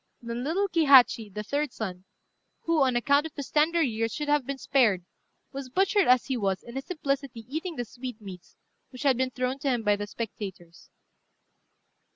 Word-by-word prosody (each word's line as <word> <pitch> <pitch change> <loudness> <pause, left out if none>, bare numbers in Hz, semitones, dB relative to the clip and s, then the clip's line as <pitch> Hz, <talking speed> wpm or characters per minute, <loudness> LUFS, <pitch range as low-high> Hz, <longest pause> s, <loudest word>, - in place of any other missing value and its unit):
Then 235 +1 -5
little 360 +8 0
Kihachi, 275 - +5
the 210 +2 -5
third 285 +5 -1
son, 185 -5 -6 0.6
who, 330 -2 +1
on 260 -2 +3
account 280 +6 +3
of 320 - -17
his 285 -3 -6
tender 320 +2 +3
years, 225 -3 -1
should 295 -1 -4
have 290 -3 +2
been 275 0 -3
spared, 230 -10 +2 0.5
was 275 -2 -7
butchered 385 - +2
as 250 0 +5
he 265 - -2
was 195 -4 -1
in 235 - -11
his 270 +1 -5
simplicity 275 -8 -3
eating 320 +5 -4
the 245 -3 -3
sweetmeats 215 -7 -9 0.3
which 255 +1 -9
had 275 -3 +4
been 260 +1 0
thrown 255 +1 -2
to 275 - -1
him 240 -3 0
by 205 -1 +3
the 205 0 -5
spectators. 195 -6 -7
255 Hz, 185 wpm, -27 LUFS, 225-290 Hz, 0.6 s, Kihachi